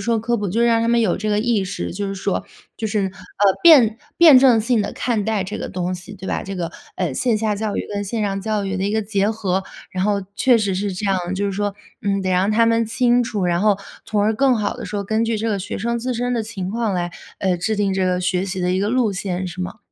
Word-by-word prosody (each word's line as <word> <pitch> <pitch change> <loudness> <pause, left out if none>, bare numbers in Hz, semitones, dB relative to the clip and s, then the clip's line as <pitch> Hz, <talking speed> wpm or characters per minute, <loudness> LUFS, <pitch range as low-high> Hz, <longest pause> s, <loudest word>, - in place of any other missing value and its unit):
说 230 -1 +2
科 235 +2 -1
普， 205 -1 -2
就 225 +6 +1
让 230 -1 +3
他 230 - 0
们 235 0 +3
有 200 -6 +1
这 215 +2 -2
个 210 0 +2
意 220 -2 +1
识， 90 - -4
就 205 +1 -3
是 195 - -4
说 195 0 -2 0.3
就 220 - -2
是， 210 0 0
呃， 190 -1 -2 0.5
辩 250 -10 +7 0.2
辩 315 -6 +8
证 255 -3 +6
性 230 +1 +1
地 200 - -2
看 235 -4 -1
待 215 -2 -1
这 210 +3 -5
个 - - -4
东 180 -1 -3
西， 180 +3 -9
对 190 -1 -9
吧？ - - -2
这 195 0 -6
个， 170 -1 -3 0.2
呃， 180 -6 -2
线 230 - +1
下 215 -1 0
教 210 0 -3
育 - - -3
跟 205 0 -2
线 220 +2 -2
上 195 -1 -1
教 210 0 -1
育 195 0 -2
的 190 - -1
一 200 - 0
个 220 +1 0
结 205 0 0
合。 195 -4 -1 0.3
然 185 - -2
后 200 0 +1
确 250 +3 +4
实 200 -4 0
是 195 +1 -2
这 185 - -5
样， 180 -1 -1
就 200 +2 -1
是 200 - -1
说， 205 0 -2 0.3
嗯， 200 -1 0
得 185 - -1
让 185 +3 +2
他 225 +2 +4
们 230 0 +2
清 245 +1 +2
楚， 210 -5 -2
然 175 -1 +1
后 210 0 +3 0.3
从 210 -2 0
而 215 +2 +2
更 260 +2 +3
好 210 -2 -1
地 - - -7
说， 205 -1 -3
根 220 +3 0
据 230 -1 0
这 220 +2 -2
个 210 -3 0
学 205 +3 -5
生 235 +3 -1
自 250 +2 -2
身 245 +1 -1
的 235 -2 0
情 205 -4 -5
况 225 -2 -1
来， 175 -1 -2 0.3
呃， 190 -2 +1
制 215 +5 -1
定 205 -1 +1
这 190 -1 +1
个 180 0 +1
学 180 0 0
习 190 -1 -4
的 180 0 0
一 185 - +1
个 200 +2 0
路 245 -3 +2
线， 185 -1 -3
是 180 +1 -7
吗？ 180 - -6
205 Hz, 300 characters per minute, -21 LUFS, 190-225 Hz, 0.5 s, 辩